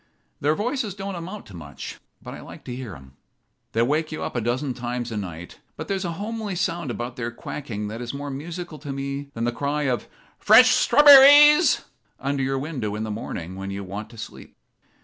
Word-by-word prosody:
Their 150 +2 +2
voices 230 - -2
don't 195 0 -5
amount 185 +4 -7
to 100 - -14
much, 75 -4 -9 0.2
but - - -8
I - - -9
like - - -12
to 125 - -6
hear 125 -8 -7
'em. 65 0 -16 0.6
They 115 - +3
wake 155 +5 0
you 155 - -4
up - - -5
a 120 - 0
dozen 125 +4 -1
times 120 -1 -4
a 110 - -3
night, 90 -4 -7 0.2
but - - -6
there's 195 -1 -2
a 170 - -2
homely 210 +1 -4
sound 170 -4 -2
about 120 +1 -5
their 120 -1 -3
quacking 120 -3 -6
that 115 +3 -6
is 120 -1 -4
more 140 0 -6
musical 165 +3 -7
to 145 0 -6
me 140 +1 -4
than 115 - -3
the 120 - +1
cry 145 +4 -2
of 130 -4 -1 0.3
'Fresh 250 +4 +7
strawber 285 +3 +8
rees!' 295 +4 +7 0.4
under 140 0 -1
your 135 0 0
window 130 -8 -3
in 105 - -3
the 110 - -4
morning 95 -4 -6
when 95 +1 -6
you 100 0 -5
want 100 +3 -7
to 115 - -14
sleep. 115 - -10
135 Hz, 210 wpm, -24 LUFS, 115-175 Hz, 0.6 s, strawber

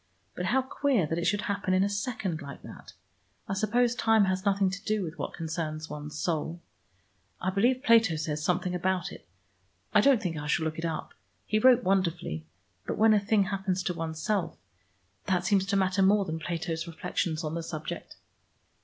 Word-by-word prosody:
But 180 - -3
how 265 +4 +2
queer 260 - +1
that 165 +2 -2
it 170 - -2
should 205 -1 +2
happen 200 -2 0
in 185 - +4
a - - +2
second, 200 -4 -3
like 140 -1 -9
that. - - -11 0.5
I - - -2
suppose 235 +5 +2
time 225 -3 +4
has 185 +1 -1
nothing 195 -1 +2
to 195 +2 -6
do 215 -2 0
with 165 0 -7
what - - -4
concerns 160 -1 -4
one's 150 0 -6
soul. 165 +1 -2 0.8
I 185 - -1
believe 245 +7 +2
Plato 225 - +5
says 155 -1 -2
something 180 +2 0
about 185 0 -1
it. - - -12 0.7
I - - +6
don't 275 -4 +5
think 180 -6 -3
I 150 0 -5
shall 160 +1 +1
look 160 0 -3
it 165 - -3
up. 160 -2 -4 0.3
He 215 - +1
wrote 250 +1 +6
wonderfully, 170 - 0 0.4
but - - -2
when 220 0 +6
a 210 - +5
thing 205 0 +2
happens 190 -1 -2
to 180 - -1
oneself, 165 +2 -2 0.7
that 180 -1 0
seems 195 -1 +2
to 200 - +1
matter 190 0 +2
more 200 +1 +4
than 160 -1 -3
Plato's 165 0 -3
reflections 165 -1 -2
on 155 0 -3
the 170 - -2
subject." 155 -2 -6
185 Hz, 190 wpm, -28 LUFS, 165-205 Hz, 0.8 s, I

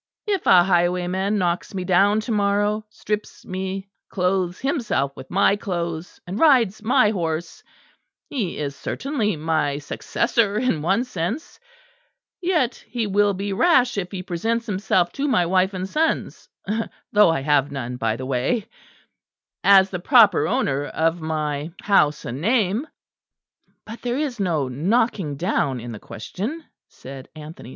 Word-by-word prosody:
If 405 -3 -1
a 175 -1 +7
highwayman 180 +2 +1
knocks 180 0 -1
me 185 - -2
down 195 +4 +3
to 230 - -5
morrow, 205 0 +1
strips 210 0 -5
me, 190 +1 -4 0.2
clothes 180 -1 0
himself 240 - -1
with - - -11
my 195 +1 +3
clothes, 170 -4 -4
and 185 +5 -5
rides 240 -10 +4
my 225 -1 +3
horse, 165 -4 -3 0.7
he 220 -11 -3
is 140 -2 -3
certainly 230 - -2
my 155 -2 0
successor 205 - 0
in 220 -10 0
one 195 +9 +1
sense; 225 - -4 0.8
yet 325 -9 0
he 240 -2 -2
will 205 0 +2
be 200 +1 -3
rash 255 - +3
if 190 -3 -3
he 185 -2 -5
presents 225 +7 -2
himself 185 -4 +1
to 285 +1 -2
my 180 -11 +3
wife 185 +2 +2
and 185 0 -3
sons 315 +9 -1 0.6
though 210 -4 +6
I 165 -4 0
have 145 -1 +2
none, 125 -3 -5
by 115 -2 0
the 130 +2 -6
way 135 - 0 1.0
as 195 -1 +6
the 180 - -3
proper 210 - +5
owner 140 +1 0
of 165 +1 0
my 155 0 -3
house 150 -8 +3
and 125 +4 -5
name." 220 - +1 1.0
"But 225 +2 -9
there 245 +1 -2
is 280 -6 -2
no 165 -8 0
knocking 180 - 0
down 140 -5 0
in 120 +1 -7
the 110 - -7
question," 220 - -6 0.2
said 135 0 -11
Anthony. 155 -4 -10
190 Hz, 145 wpm, -22 LUFS, 160-220 Hz, 1.0 s, a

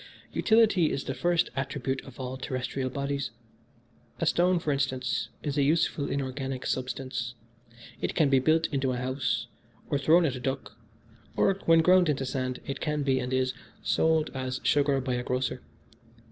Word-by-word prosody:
Utility 220 -7 +4
is 135 - -2
the 135 - -3
first 175 +3 +1
attribute 135 0 -2
of 135 -1 -13
all 130 0 -4
terrestrial 130 0 -3
bodies. 140 +1 -2 0.9
A - - 0
stone, 180 +1 +3
for 155 -3 -1
instance, 130 -4 -1
is 145 0 -1
a - - +4
useful 150 0 +1
inorganic 135 -1 -3
substance 125 -1 -3 0.7
it - - -2
can 155 - +4
be 135 -1 +4
built 160 +4 +3
into 135 -2 0
a - - -2
house, 130 +2 -1 0.5
or 145 - +2
thrown 165 +5 +5
at 140 - +1
a - - -5
duck, 130 -4 -4 0.6
or, - - +3
when 165 0 +6
ground 180 -1 +5
into 135 -2 0
sand, 130 -1 -3
it 140 0 -4
can 150 -2 -1
be, 135 -1 +2
and 125 - -3
is, 130 0 +1 0.3
sold 160 -1 +2
as 130 -1 -3
sugar 140 -1 +3
by 130 -1 -2
a 125 - -1
grocer. 125 +1 -2
135 Hz, 170 wpm, -28 LUFS, 130-150 Hz, 0.9 s, when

